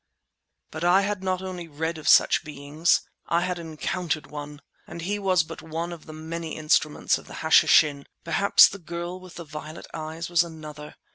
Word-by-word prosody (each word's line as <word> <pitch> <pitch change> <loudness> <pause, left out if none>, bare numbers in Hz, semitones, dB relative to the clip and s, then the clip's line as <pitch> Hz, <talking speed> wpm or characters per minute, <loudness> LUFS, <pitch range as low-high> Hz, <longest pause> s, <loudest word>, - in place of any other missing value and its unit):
But 155 +2 -6
I 180 +3 +5
had 200 -1 -2
not 185 0 -1
only 180 -2 -6
read 160 +2 -3
of 155 - -1
such - - +5
beings, 150 +2 0 0.3
I 170 +1 +2
had 180 0 -2
encountered 165 0 -3
one! 145 0 -8 0.2
And 170 - -8
he 205 +4 -2
was 185 -4 +2
but 165 +1 -9
one 165 +2 -4
of 165 -2 -12
the - - -8
many 160 +1 -6
instruments 155 -1 +1
of - - -16
the - - -10
Hashishin. 145 -2 +5 0.2
Perhaps 200 +1 +6
the 200 - -9
girl 175 +1 -6
with 185 -1 -13
the 170 - -8
violet 155 +1 -8
eyes 160 +1 -5
was 175 -1 +3
another. 155 -3 -10
165 Hz, 185 wpm, -25 LUFS, 155-175 Hz, 0.3 s, Perhaps